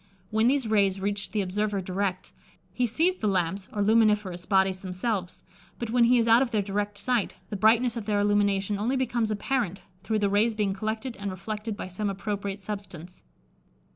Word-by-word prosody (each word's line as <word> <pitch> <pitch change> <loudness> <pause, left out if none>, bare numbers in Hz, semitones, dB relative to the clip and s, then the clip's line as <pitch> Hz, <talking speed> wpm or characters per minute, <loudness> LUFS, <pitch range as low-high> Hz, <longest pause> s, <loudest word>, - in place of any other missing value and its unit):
When 220 +2 +3
these 265 -2 +2
rays 200 -3 +2
reach 205 +1 -2
the 215 - -1
observer 205 +2 -1
direct, 185 0 -3 0.4
he 250 -1 +1
sees 330 - +1
the 215 - -1
lamps 190 0 -1
or 205 - -1
luminiferous 210 -4 +2
bodies 190 -1 +2
themselves, 185 0 -3 0.3
but 235 -2 -4
when 240 0 +4
he 245 +1 +5
is 230 -1 +2
out 230 +2 +6
of 265 - +1
their 215 -3 0
direct 205 +1 -2
sight, 235 0 0 0.2
the - - -2
brightness 225 +4 +3
of 230 -3 -5
their 205 -1 +1
illumination 205 -1 +1
only 240 +6 0
becomes 240 -4 0
apparent, 215 -2 -1 0.2
through 220 +2 -1
the 205 -1 +2
rays 210 +3 +2
being 205 -2 0
collected 220 +5 -4
and 200 0 -4
reflected 210 +3 -5
by - - -5
some 200 +3 -3
appropriate 200 0 -4
substance. 185 -4 -7
205 Hz, 185 wpm, -27 LUFS, 195-225 Hz, 0.4 s, out